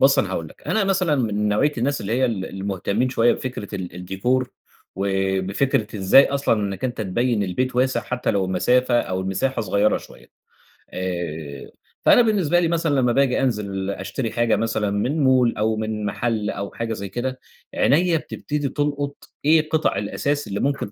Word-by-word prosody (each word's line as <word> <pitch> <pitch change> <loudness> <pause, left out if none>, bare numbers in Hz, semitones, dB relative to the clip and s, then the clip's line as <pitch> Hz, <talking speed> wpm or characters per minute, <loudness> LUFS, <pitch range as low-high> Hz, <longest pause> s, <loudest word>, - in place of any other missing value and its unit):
بُصّ، - - +5
أنا - - +1
هاقول - - -3
لك، - - -19
أنا 220 -2 +1
مثلًا 185 -5 +2
من 105 -4 0
نوعية 120 +9 +2
الناس 140 +4 0
اللي 100 - -3
هي 130 +2 +2
ال 110 -6 -1
المهتمين 100 +5 -1
شوية 120 -2 +3
بفكرة 115 -5 -5
ال 90 -3 -5
الديكور 95 +9 -1 0.4
وبفكرة 95 +4 0
إزاي 95 +8 +6
أصلًا 140 -3 +1
إنك 100 0 -3
أنت 125 -2 -2
تبيّن 110 +2 0
البيت 125 +7 -2
واسع 130 +1 +2
حتى 125 -1 -2
لو 100 -3 +1
المسافة 120 +7 +2
أو 95 0 -3
المساحة 115 +7 -1
صغيرة 100 +1 +2
شوية، - - -15 0.7
آآ، 80 -6 -5 0.3
فأنا - - +7
بالنسبة 195 -7 +2
لي 170 - +2
مثلًا 165 -3 +1
لما 125 -3 +3
باجي 135 0 +2
أنزل 100 -6 -1
أشتري 100 +5 -3
حاجة 120 -1 +2
مثلًا 110 -2 -1
من 130 +10 0
مول 130 -3 +3
أو 110 +1 +1
من 110 -1 -3
محل 110 0 -1
أو 100 0 -4
حاجة 115 -1 -3
زي 100 -2 -6
كده، 130 +5 -3 0.4
عينيَّا 165 +4 +3
بتبتدي 150 -2 -4
تُلقُط 145 0 -3 0.2
إيه 155 0 +4
قِطَع 160 0 +1
الأثاث 145 +8 -2
اللي 100 +1 -3
ممكن 140 -7 -1
115 Hz, 170 wpm, -22 LUFS, 100-135 Hz, 0.7 s, فأنا